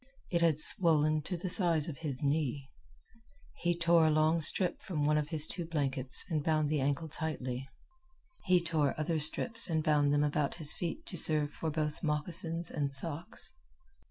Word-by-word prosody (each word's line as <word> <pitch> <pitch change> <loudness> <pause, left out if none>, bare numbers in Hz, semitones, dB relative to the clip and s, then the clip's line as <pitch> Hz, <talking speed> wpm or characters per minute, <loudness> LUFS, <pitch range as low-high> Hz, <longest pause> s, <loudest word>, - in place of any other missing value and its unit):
It 170 -2 0
had 160 -3 +1
swollen 155 -2 +6
to 180 - -4
the 180 - -6
size 170 -5 +3
of 155 -5 -8
his 145 -4 -4
knee. 140 -2 -3 0.9
He 175 0 -2
tore 170 -1 +3
a - - +2
long 155 +2 +1
strip 175 +3 +3
from 150 -6 -4
one 150 +1 +1
of 150 -1 -2
his 160 -2 +7
two 175 - -3
blankets 140 -5 -3
and 155 -4 -3
bound 155 -1 -1
the 150 -3 -1
ankle 145 +4 -2
tightly. 135 -5 -5 0.8
He 180 -1 +3
tore 155 -4 -1
other 160 +1 -2
strips 225 +10 +1
and 160 -2 -1
bound 145 -2 +1
them 145 0 +1
about 145 -1 -2
his 155 -4 +3
feet 180 - -6
to - - -3
serve 150 -2 +3
for 160 - -5
both 150 -1 -4
moccasins 165 +2 -3
and 145 -2 -3
socks. 165 - -4
155 Hz, 180 wpm, -30 LUFS, 145-165 Hz, 0.9 s, his